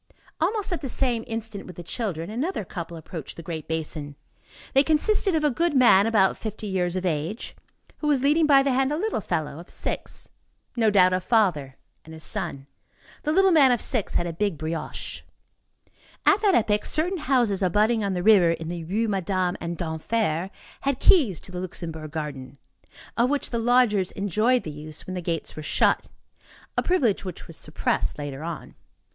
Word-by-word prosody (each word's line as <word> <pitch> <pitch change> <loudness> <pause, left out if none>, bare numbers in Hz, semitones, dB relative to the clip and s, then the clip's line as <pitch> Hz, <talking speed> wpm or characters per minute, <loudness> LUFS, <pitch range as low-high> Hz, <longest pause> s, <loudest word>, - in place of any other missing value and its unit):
Almost 395 +3 0
at 350 - -3
the 270 - -3
same 240 -3 0
instant 225 -3 -5
with 180 - -10
the 175 - -8
children, 180 -3 -4
another 260 - -2
couple 170 -1 -6
approached 160 -1 -8
the 170 - -8
great 160 -2 -6
basin. 155 -2 -4 0.6
They 270 - +6
consisted 345 +5 +3
of 310 - +1
a 295 - +3
goodman, 255 - +4
about 205 -4 +3
fifty 220 0 -6
years 185 -3 -1
of 185 0 -2
age, 165 +6 -3 0.4
who 300 - -2
was 280 -3 +2
leading 300 +3 +4
by 275 -2 +6
the 275 - +1
hand 265 +2 +2
a 300 - 0
little 410 - -1
fellow 155 -4 -3
of 175 - -12
six. - - -5 0.5
No 225 -3 +3
doubt, 185 -3 +5
a 185 - +2
father 175 - +1 0.3
and 160 0 -11
his 160 - -7
son. 135 -1 -3 0.6
The 300 - -1
little 385 +3 +4
man 285 -6 +6
of 240 - +2
six 230 -3 -1
had 175 - +1
a 170 - -3
big 200 -1 -1
brioche. 160 +2 -4 1.0
At 405 +1 +5
that 405 -4 +4
epoch, 210 -2 +2
certain 355 +4 -1
houses 245 -9 +1
abutting 210 +4 +2
on 200 -1 -1
the 180 -1 -2
river, 195 -5 +6
in 165 -1 -2
the 170 -1 -4
Rues 210 +8 -1
Madame 185 -2 0
and 170 0 -4
d'Enfer, 170 +1 -1 0.3
had 275 -2 0
keys 250 - +4
to - - -7
the 180 - -5
Luxembourg 165 -4 -5
garden, 140 -4 -6 0.6
of 240 +2 +3
which 290 -1 -1
the 235 - -1
lodgers 230 -5 +3
enjoyed 215 +6 +1
the 155 - -5
use 150 +1 -9
when 185 - -6
the 180 - -3
gates 165 -2 -3
were 155 - -6
shut, 150 - +2 0.7
a - - +2
privilege 270 - +1
which 185 -3 -7
was 165 - -10
suppressed 155 - -1
later 145 -1 -6
on. 165 -1 -6
200 Hz, 185 wpm, -25 LUFS, 165-255 Hz, 1.0 s, They